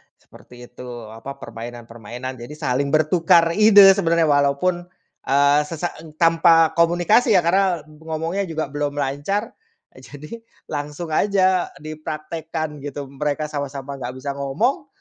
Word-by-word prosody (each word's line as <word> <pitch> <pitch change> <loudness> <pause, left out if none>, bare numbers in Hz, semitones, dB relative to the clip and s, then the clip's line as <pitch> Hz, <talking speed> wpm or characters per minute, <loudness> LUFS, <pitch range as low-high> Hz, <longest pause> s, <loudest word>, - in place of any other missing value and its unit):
seperti 125 0 -16
itu, 125 0 -11 0.2
apa, 125 +5 -8
permainan-permainan 120 +2 -9
jadi 120 +5 -9
saling 140 0 -1
bertukar 165 +2 +3
ide. 205 0 +8
Sebenarnya 170 -4 +2
walaupun, 145 +5 +1 0.4
eee, 140 +2 +4
sesa 170 +2 -4
e 155 -1 -13
tanpa 165 -1 +4
komunikasi 175 +7 +3
ya, 180 - +4
karena 180 -2 +1
ngomongnya 160 +5 -4
juga 160 -4 -4
belum 145 0 -3
lancar, 145 - -2 0.4
jadi 145 - -11 0.3
langsung 150 +3 -5
aja 185 +1 +2
dipraktekkan 155 0 -6
gitu, 145 0 -6
mereka 150 +2 -2
sama-sama 140 -1 -5
nggak 125 +1 -6
bisa 140 +2 -5
ngomong, 200 - -1
155 Hz, 125 wpm, -21 LUFS, 140-170 Hz, 0.4 s, ide